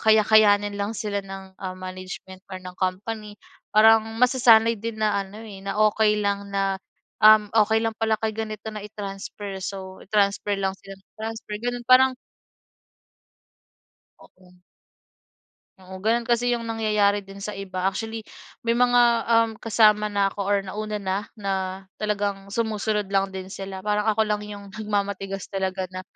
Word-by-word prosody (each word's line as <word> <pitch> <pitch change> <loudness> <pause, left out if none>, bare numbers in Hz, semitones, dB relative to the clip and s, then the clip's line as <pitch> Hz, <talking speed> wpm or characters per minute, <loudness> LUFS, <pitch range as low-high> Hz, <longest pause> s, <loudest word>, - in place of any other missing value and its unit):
kaya-kayanin 215 -1 +5
lang 200 +2 -2
sila 205 -2 -2
ng, 195 -1 -10
ah, 185 -1 -5
management 185 0 -8
or 185 - -4
ng 180 0 -9
company 205 +3 -3 0.4
parang 220 +1 +7 0.2
masasanay 235 -3 +5
din 225 +1 -5
na 210 -2 +2
ano, 195 +2 -12
eh, 200 -3 -10
na 200 - -3
okey 210 0 +2
lang 200 0 -1
na, 195 -1 0 0.5
um, 215 -1 +8 0.2
okey 220 +1 +1
lang 225 -1 -1
pala 220 -1 +1
kay 220 -1 -1
ganito 220 -1 -5
na 210 -1 -6
i-transfer. 200 -1 -7
So 190 -1 -7
i-transfer 205 0 +1
lang 190 -1 -1
sila 195 0 -11
ng 195 - -37
transfer 220 -1 -5
gano'n, 245 -1 -3
parang 260 +1 +7 2.1
Oo. 180 -1 -20 1.2
Oo, 185 0 -11
gano'n 230 +3 +1
kasi 240 +1 +1
'yong 235 -1 -1
nangyayari 210 -2 +1
din 195 0 -12
sa 210 +1 -5
iba 190 -1 -4
actually 220 +3 -3 0.4
may 230 - +3
mga, 245 0 +4 0.3
um, 230 -1 +4
kasama 210 -1 +4
na 200 -1 +1
ako - - -12
or 200 +1 +2
nauna 210 +2 -4
na 190 -1 -2 0.2
na 200 -1 -3 0.5
talagang 200 -2 -2
sumusunod 215 -1 -1
lang 195 0 +2
din 190 -1 -6
sila 195 0 -7
parang 210 +1 +1
ako 220 +1 +2
lang 210 -1 -1
'yong 205 -2 -9
nagmamatigas 200 -2 -3
talaga 190 -1 -1
na, 185 - -5
205 Hz, 155 wpm, -24 LUFS, 195-220 Hz, 2.1 s, um